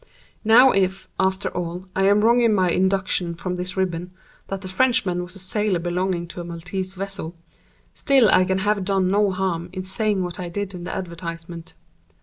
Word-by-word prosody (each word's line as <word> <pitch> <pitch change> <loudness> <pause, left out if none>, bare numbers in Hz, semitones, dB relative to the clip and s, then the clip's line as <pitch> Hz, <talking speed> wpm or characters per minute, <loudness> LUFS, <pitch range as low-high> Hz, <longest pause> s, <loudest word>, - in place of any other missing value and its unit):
Now 240 +4 +7
if, 190 0 0
after 190 0 +1
all, 175 +1 -5
I 195 - +2
am 205 +1 +4
wrong 235 +3 +4
in 230 -3 +4
my 185 -3 +2
induction 185 -2 +1
from 180 +2 -4
this 180 +1 -4
ribbon, 180 -2 -1 0.4
that 195 -1 -4
the 190 - -7
Frenchman 185 -3 +1
was 180 +2 -5
a - - -9
sailor 195 +1 -1
belonging 175 +1 -1
to 175 - -6
a - - -6
Maltese 185 +3 -5
vessel, 190 -3 -4 0.6
still 270 -5 +4
I 185 - +5
can 190 +1 0
have 205 0 0
done 190 -1 +1
no 205 0 +3
harm 180 -2 -2
in 185 0 -5
saying 195 +1 -1
what 175 0 -5
I 180 -1 -4
did 200 +2 -4
in 175 -1 -7
the - - -4
advertisement. 170 -1 -7
185 Hz, 190 wpm, -23 LUFS, 175-195 Hz, 0.6 s, Now